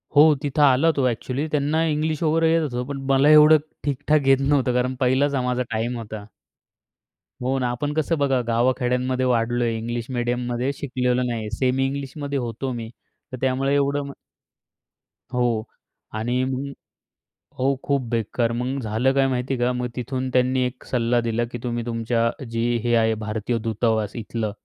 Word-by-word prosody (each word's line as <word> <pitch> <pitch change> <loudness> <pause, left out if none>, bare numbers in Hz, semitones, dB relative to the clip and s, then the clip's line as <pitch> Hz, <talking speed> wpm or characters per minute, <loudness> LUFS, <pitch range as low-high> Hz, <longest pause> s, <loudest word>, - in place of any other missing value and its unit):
हो. 145 - +8 0.2
तिथं 145 +1 0
आला 140 +4 +5
तो. 135 - +2
अ‍ॅक्चुअली 130 +6 -3
त्यांना 150 +2 +1
इंग्लिश 155 +1 -1
वगैरे 160 +1 +3
येत 165 - +3
होतं, 125 -4 -2
पण 140 -1 -5
मला 135 +2 +5
एवढं 155 +1 +8 0.3
ठीक 140 -3 -1
ठाक 150 -3 +3
येत 135 -1 +6
नव्हतं, 135 -4 +2
कारण 125 +1 0
पहिलाच 135 +3 +2
हा 130 - +1
माझा 125 0 0
टाईम 115 +2 -1
होता. 110 -2 -7 1.2
हो 135 +1 0
ना. 125 - 0
आपण 145 +4 -3
कसं 160 +1 0
बघा, 135 -3 +2
गावा 120 +2 +3
खेड्यांमध्ये 125 +1 0
वाढलोय. 120 -1 +1
इंग्लिश 120 +1 -4
मीडियममध्ये 120 +1 -1
शिकलेलो 125 -2 -1
नाहीये. 115 -3 -3
सेमी 130 +3 +1
इंग्लिशमध्ये 140 +1 -4
होतो 120 +2 -4
मी, 115 -1 -6 0.4
तर 130 - -5
त्यामुळे 135 +1 +1
एवढं 140 0 +1
मग 140 - -7 1.2
हो. 120 -3 +1 0.5
आणि 120 +4 -1
मग 135 +1 -3 0.9
हो, 135 +1 +2
खूप 140 -1 +1
बेकार 115 +1 0
मग 125 +3 -2
झालं, 115 +5 +1
काय 135 -1 +3
माहिती 130 +1 -1
आहे 125 - -3
का, 125 - +2
मग 125 0 -2
तिथून 130 +1 -3
त्यांनी 130 +1 +2
एक 125 0 -6
सल्ला 120 -1 +1
दिला 115 0 -1
की 120 - -4
तुम्ही 120 -1 -2
तुमच्या 115 0 0 0.2
जी 115 0 -1 0.2
हे 120 0 +2
आहे 110 -1 +3
भारतीय 110 +2 -2
दूतावास 110 -1 0
इथलं, 110 -2 -3
125 Hz, 170 wpm, -23 LUFS, 120-140 Hz, 1.2 s, हो